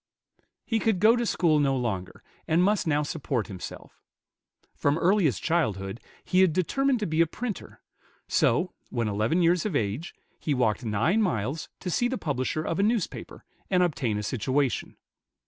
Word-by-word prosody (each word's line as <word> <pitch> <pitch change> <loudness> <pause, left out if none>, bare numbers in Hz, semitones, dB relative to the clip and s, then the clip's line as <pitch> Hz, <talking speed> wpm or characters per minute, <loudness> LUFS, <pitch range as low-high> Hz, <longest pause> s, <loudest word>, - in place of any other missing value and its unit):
He 225 -2 0
could 220 -4 +1
go 220 +4 +6
to 240 -1 -1
school 160 -6 +2
no 135 -2 +2
longer, 100 -7 -4 0.2
and 165 +3 +3
must 205 -2 +2
now 150 -1 +2
support 140 -6 -2
himself. 95 -4 -9 0.7
From 145 +2 +1
earliest 170 - +2
childhood 110 - 0 0.3
he 185 - +2
had 185 -4 +4
determined 255 - +1
to - - 0
be 160 -1 +1
a 165 - +4
printer; 220 +5 -6 0.5
so, - - +2 0.2
when 115 -2 -1
eleven 110 - +1
years 170 0 +3
of 200 -8 -2
age, 115 +7 -2 0.2
he 150 - -1
walked 120 -2 +1
nine 120 - +1
miles 145 - -1
to 180 - -3
see 245 - +2
the 260 +1 -2
publisher 145 - -2
of 165 +2 -2
a - - +4
newspaper, 215 -2 -2 0.2
and 180 -2 +3
obtain 130 -11 0
a 105 - -3
situation. 130 +4 -1
155 Hz, 165 wpm, -27 LUFS, 120-185 Hz, 0.7 s, go